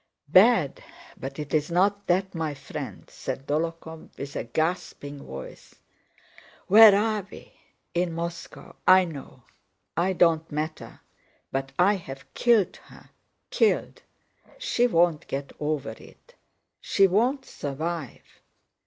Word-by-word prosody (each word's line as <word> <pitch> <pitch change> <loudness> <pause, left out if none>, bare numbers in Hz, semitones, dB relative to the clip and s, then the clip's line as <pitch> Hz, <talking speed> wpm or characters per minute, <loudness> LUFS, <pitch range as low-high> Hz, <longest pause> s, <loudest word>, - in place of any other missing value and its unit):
"Bad! 185 - +4 0.3
But 135 +1 -7
it's 150 +1 -1
not 200 +4 +1
that, 190 +2 +1
my 160 -4 -3
friend—" 140 0 -8
said 135 - -6
Dólokhov 160 +1 -3
with 140 +1 -7
a - - -3
gasping 145 0 -3
voice. 65 0 -10 0.9
"Where 215 +1 +9
are 210 -2 -1
we? - - -13 0.4
In 175 0 0
Moscow, 170 +1 -7
I 185 0 +7
know. 140 -6 -10 0.5
I 180 +3 +1
don't 165 -3 +2
matter, 155 +1 -5 0.5
but 135 0 -3
I 195 +3 +4
have 135 -6 -10
killed 230 -6 +2
her, - - -18 0.4
killed... 465 -3 +1 0.6
She 375 - +1
won't 170 -6 +2
get 140 0 -4
over 150 -1 -2
it! - - -16 0.5
She 195 - +3
won't 245 +8 +1
survive...." 155 0 -5
170 Hz, 120 wpm, -26 LUFS, 145-195 Hz, 0.9 s, Where